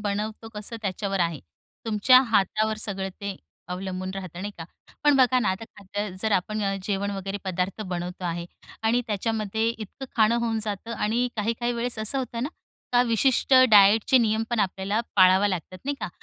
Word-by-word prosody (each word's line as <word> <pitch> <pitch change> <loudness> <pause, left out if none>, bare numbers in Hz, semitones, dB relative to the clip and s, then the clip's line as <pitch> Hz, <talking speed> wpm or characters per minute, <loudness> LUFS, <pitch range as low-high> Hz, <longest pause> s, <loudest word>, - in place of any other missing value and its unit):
बनवतो 210 +2 -3
कसं 210 +2 -6
त्याच्यावर 195 0 -2
आहे. 170 -4 0 0.5
तुमच्या 225 +4 +6
हातावर 215 +1 +2
सगळं 195 -3 -3
ते 200 -1 -4 0.3
अवलंबून 185 +1 -4
राहतं. 185 -3 -7
नाही 205 +2 -5
का? 165 - -6 0.4
पण 295 -1 +5
बघा 255 -1 +4
ना, 230 - +1
आता 190 +4 -2
खाद्य 205 +1 -4
जर 220 -1 0
आपण 215 +3 0 0.2
जेवण 200 +1 -1
वगैरे 195 0 -4
पदार्थ 185 +2 -2
बनवतो 180 -1 -5
आहे 170 0 -3 0.4
आणि 225 +2 +2
त्याच्यामध्ये 220 +1 -1
इतकं 230 +3 -6
खाणं 225 +1 +4
होऊन 225 -1 0
जातं 210 +2 -4
आणि 230 +4 0
काही-काही 230 +3 -1
वेळेस 235 0 -2
असं 220 +5 +2
होतं 240 -3 -4
ना 275 - -1 0.4
का 245 - +5
विशिष्ट 250 +3 +2 0.2
डायटचे 210 +4 +6
नियम 220 -2 +2
पण 235 -2 +1
आपल्याला 195 +2 0 0.2
पाळावा 190 +1 +6
लागतात. 185 0 -4
नाही 285 +1 -1
का? - - -3
210 Hz, 170 wpm, -25 LUFS, 190-225 Hz, 0.5 s, तुमच्या